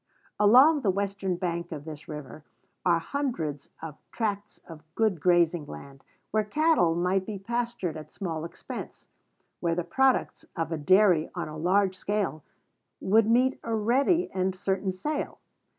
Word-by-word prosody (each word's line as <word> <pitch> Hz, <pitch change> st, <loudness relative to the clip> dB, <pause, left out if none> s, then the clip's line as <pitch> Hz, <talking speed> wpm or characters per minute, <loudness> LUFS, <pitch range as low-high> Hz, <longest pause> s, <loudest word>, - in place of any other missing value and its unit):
Along 260 Hz, +9 st, +6 dB
the 210 Hz, -, +1 dB
western 195 Hz, -1 st, -1 dB
bank 170 Hz, -1 st, -3 dB
of 150 Hz, -2 st, -6 dB
this 155 Hz, -2 st, -9 dB
river 150 Hz, 0 st, -8 dB, 0.4 s
are 175 Hz, -2 st, +4 dB
hundreds 165 Hz, -, -3 dB
of 155 Hz, -2 st, -7 dB
tracts 205 Hz, -2 st, -3 dB
of 160 Hz, -2 st, -10 dB
good 215 Hz, -6 st, +1 dB
grazing 175 Hz, -3 st, +3 dB
land, 135 Hz, -, -11 dB, 0.3 s
where 215 Hz, 0 st, +2 dB
cattle 295 Hz, -, +2 dB
might 180 Hz, +2 st, +1 dB
be 205 Hz, +1 st, -5 dB
pastured 235 Hz, -4 st, -3 dB
at 155 Hz, -1 st, -9 dB
small 165 Hz, -5 st, -4 dB
expense; 170 Hz, -, -8 dB, 0.5 s
where 170 Hz, -1 st, 0 dB
the 175 Hz, -, -1 dB
products 265 Hz, +9 st, +1 dB
of 165 Hz, 0 st, -2 dB
a 165 Hz, -, -1 dB
dairy 185 Hz, 0 st, +4 dB
on -, -, -3 dB
a 155 Hz, -, -8 dB
large 185 Hz, +4 st, +2 dB
scale 200 Hz, -7 st, -2 dB, 0.6 s
would 215 Hz, +2 st, +3 dB
meet 255 Hz, +3 st, +3 dB
a 225 Hz, -, -1 dB
ready 270 Hz, -, +2 dB
and 185 Hz, 0 st, 0 dB
certain 190 Hz, +1 st, -1 dB
sale. 285 Hz, +12 st, -4 dB
185 Hz, 150 wpm, -27 LUFS, 165-220 Hz, 0.6 s, Along